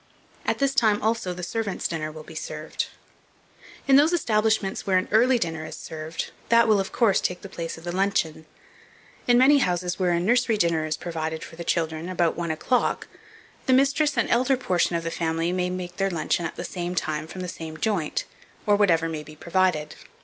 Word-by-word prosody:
At - - +1
this 275 -1 +1
time, 215 -6 +3
also, 220 -4 0
the 180 0 -6
servants' 210 +2 -2
dinner 155 -2 -3
will 155 0 -10
be 160 - -12
served. 155 0 -4 1.0
In 270 0 +7
those 305 +4 +5
establishments 215 - +1
where 190 -1 +4
an 185 - 0
early 245 +4 +5
dinner 165 -7 -3
is - - -7
served, 160 +1 -6 0.2
that 235 0 +5
will, 215 -2 +4
of 195 - -2
course, 225 -6 +3
take 180 0 -2
the - - -6
place 165 -3 -5
of 165 - -12
the 175 +1 -4
luncheon. 160 -5 0 0.8
In 245 -1 +5
many 280 +3 +6
houses, 180 -4 -1
where 185 -1 +2
a 170 -1 +2
nursery 230 +4 +2
dinner 170 -4 +1
is 155 - -2
provided 160 -2 -4
for - - -10
the 170 - -6
children 160 -2 -1
and 175 - -6
about 175 -3 +1
one 170 0 -3
o'clock, 160 +11 0 0.6
the 260 - +5
mistress 280 +3 +3
and - - +2
the - - +2
elder 255 +2 +3
portion 180 -8 +1
of 165 - -1
the 165 - -3
family 165 +1 -1
make 180 -1 -3
their 195 0 +1
luncheon 170 0 0
at - - -10
the - - -5
same 175 0 -4
time 155 -2 -2
from 185 +3 -7
the 180 - -4
same 160 -2 -7
joint, 175 -3 -1 0.4
or 205 - +4
whatever 170 -6 +3
may 160 -2 -4
be 155 +1 -12
provided. 170 -2 0
180 Hz, 210 wpm, -25 LUFS, 165-215 Hz, 1.0 s, In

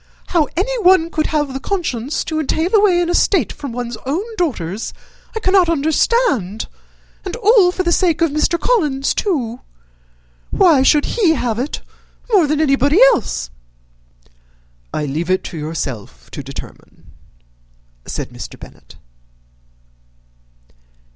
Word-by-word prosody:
How 325 -5 +2
anyone 375 -5 +3
could 310 -1 0
have 295 -3 -1
the 265 - -4
conscience 295 - -2
to 315 -1 -3
entail 320 +5 -1
away 405 -5 +4
an 345 - 0
estate 355 +1 +2
from 280 -4 -7
one's 240 -1 -5
own 295 +9 -1
daughters 225 - -3 0.4
I - - -1
cannot 375 -4 +3
understand; 300 - +1 0.6
and 375 +1 -5
all 430 -5 +4
for 370 - -2
the 345 - +1
sake 345 -2 +2
of 330 -3 +2
Mr. 305 +3 +1
Collins, 300 - +1
too! 255 - -2 0.9
Why 330 -8 +4
should 290 +2 +4
he 360 -9 +2
have 240 -4 -2
it 270 +5 -3 0.5
more 365 -7 +5
than 300 +1 0
anybody 285 - +3
else?" 60 - -3 1.4
"I 150 - -2
leave 155 +5 -3
it 185 0 +1
to 170 - -7
yourself 135 - -6
to - - -6
determine," - - -11 1.0
said - - -5
Mr. - - -9
Bennet. - - -15
310 Hz, 130 wpm, -18 LUFS, 245-360 Hz, 1.4 s, more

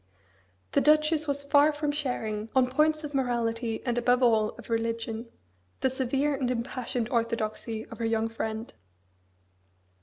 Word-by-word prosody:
The - - +3
Duchess 305 +1 +3
was 285 0 -1
far 285 +2 +5
from 295 0 -1
sharing, 225 -7 -2
on 255 -1 +4
points 305 +3 +2
of 295 -1 -6
morality, 235 -3 -1
and 240 -1 +1
above 245 +1 +3
all 220 -3 +4
of - - -11
religion, 230 0 -2 0.5
the 265 - +2
severe 270 +3 0
and 265 -3 -1
impassioned 245 -1 -2
orthodoxy 230 -1 -2
of 230 - -11
her 230 - -1
young 225 0 +1
friend. 225 0 -4
245 Hz, 145 wpm, -28 LUFS, 225-280 Hz, 0.5 s, far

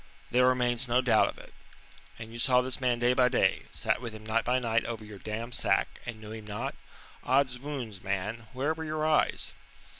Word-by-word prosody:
"There 125 +1 +5
remains 125 0 +2
no 125 +1 +3
doubt 120 -4 +4
of - - -8
it." - - -13 0.6
"And 115 0 -9
you 120 - -6
saw 125 0 +5
this 130 +1 -3
man 125 -2 +2
day 120 +1 +3
by 125 0 +4
day, - - +2
sat - - 0
with 115 -3 -6
him 110 0 -11
night 110 +1 +1
by 125 +1 +2
night 115 -2 +1
over 115 -2 -5
your 105 -2 -10
damned 115 +4 -5
sack, - - +1
and 115 -2 -5
knew 110 -1 -9
him 110 -1 -8
not? 120 +7 -3 0.5
Oddswounds, 130 -5 -1
man, 105 +4 -3
where 140 +5 0
were 160 0 -6
your 155 0 -2
eyes?" 155 -1 +2
120 Hz, 205 wpm, -29 LUFS, 110-130 Hz, 0.6 s, There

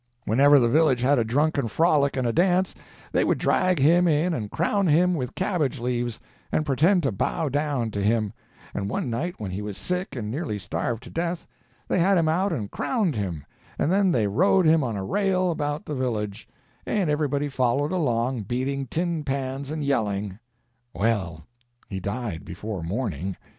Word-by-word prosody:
Whenever 140 +6 +5
the 120 -3 +4
village 135 -1 +3
had 135 +1 +3
a - - +3
drunken 140 +3 +1
frolic 145 +2 +2
and 130 - 0
a 115 - +1
dance, 180 +2 +2 0.4
they - - +2
would - - +1
drag 185 -1 +2
him 170 +6 +4
in 165 +3 +2
and 110 -9 -3
crown 195 - +1
him 175 +4 +4
with 130 -6 -3
cabbage 175 -8 0
leaves, 120 -1 -2 0.3
and 155 - +1
pretend 165 +6 +3
to 135 - +1
bow 155 - -1
down 140 -5 -1
to 100 - -3
him; 110 0 +1 0.4
and 100 0 -3
one 120 - -2
night 170 +10 -2
when 100 -4 -5
he 95 +3 -4
was 105 -1 -5
sick 180 -2 -3
and 110 -4 -4
nearly 140 -5 -3
starved 105 +4 -3
to 120 - -11
death, 170 +1 -2 0.4
they - - +1
had 190 +3 +4
him 165 -2 +2
out 185 +5 +1
and 105 -4 -3
crowned 205 - 0
him, 90 -8 -3 0.3
and 155 - +1
then 195 -1 +3
they 115 -9 +2
rode 180 - +3
him 160 -1 +5
on 115 -5 -2
a 95 - -3
rail 185 - +1
about 145 -2 -3
the 150 - -4
village, 110 -7 -3 0.3
and 200 -5 0
everybody 145 -1 0
followed 135 +2 0
along, 125 -8 0
beating 130 +5 -2
tin 165 +3 -2
pans 135 0 -3
and 155 0 -3
yelling. 105 -7 -1 0.6
Well, 95 -8 -1 0.4
he 95 - -4
died 100 -3 -4
before 100 +2 -6
morning. 95 - -3
135 Hz, 185 wpm, -25 LUFS, 110-165 Hz, 0.6 s, Whenever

